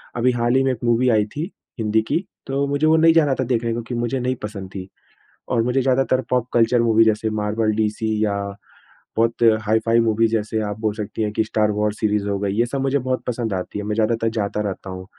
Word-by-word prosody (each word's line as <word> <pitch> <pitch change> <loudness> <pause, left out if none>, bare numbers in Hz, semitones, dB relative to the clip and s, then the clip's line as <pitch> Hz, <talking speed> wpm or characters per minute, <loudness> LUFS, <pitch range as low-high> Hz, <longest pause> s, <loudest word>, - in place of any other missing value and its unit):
अभी 125 +1 +2
हाल 120 0 +1
ही 135 - +4
में 135 - +2
एक 125 -1 -6
मूवी 120 +1 +3
आई 110 -3 +3
थी 160 +7 -4 0.3
हिंदी 110 0 +2
की, 175 - 0 0.2
तो 135 +1 0
मुझे 145 +2 +1
वो 160 - +5
नहीं 165 0 +5
जाना 150 -4 +4
था - - +2
देखने 120 -2 0
को 120 - -3
क्यों 120 +1 -5
मुझे 120 +2 -1
नहीं 125 +1 -1
पसंद 100 -3 -6
थी। 95 -1 -6 0.6
और 115 -2 +1
मुझे 125 +3 +1
ज़्यादातर 130 0 +2
पॉप 125 -1 +1
कल्चर 120 0 +3
मूवी 115 -1 +4
जैसे 110 0 +1
मार्बल 110 +1 0
डीसी 110 0 -1
या, 100 -1 -2 0.6
बहुत 115 +1 +1 0.2
हाई-फ़ाई 110 +2 +2
मूवीज़ 115 0 +2
जैसे 110 0 -1
आप 105 0 -4
बोल 110 -1 0
सकती 105 0 -5
हैं 105 -1 0
कि 110 - +1
स्टार 105 -1 +1
वॉर्स 105 0 -1
सीरीज़ 105 -2 0
हो 100 - 0
गई, 100 -1 -1
ये 115 +3 +2
सब 135 +3 -3
मुझे 135 +1 +1
बहुत 130 0 -2
पसंद 115 -3 -2
आती 95 +2 -4
है। 105 - -5
मैं 105 0 -2
ज़्यादातर 115 +1 +1
जाता 105 0 -1
रहता 95 0 -6
हूँ। 95 0 -7
115 Hz, 235 wpm, -21 LUFS, 105-125 Hz, 0.6 s, वो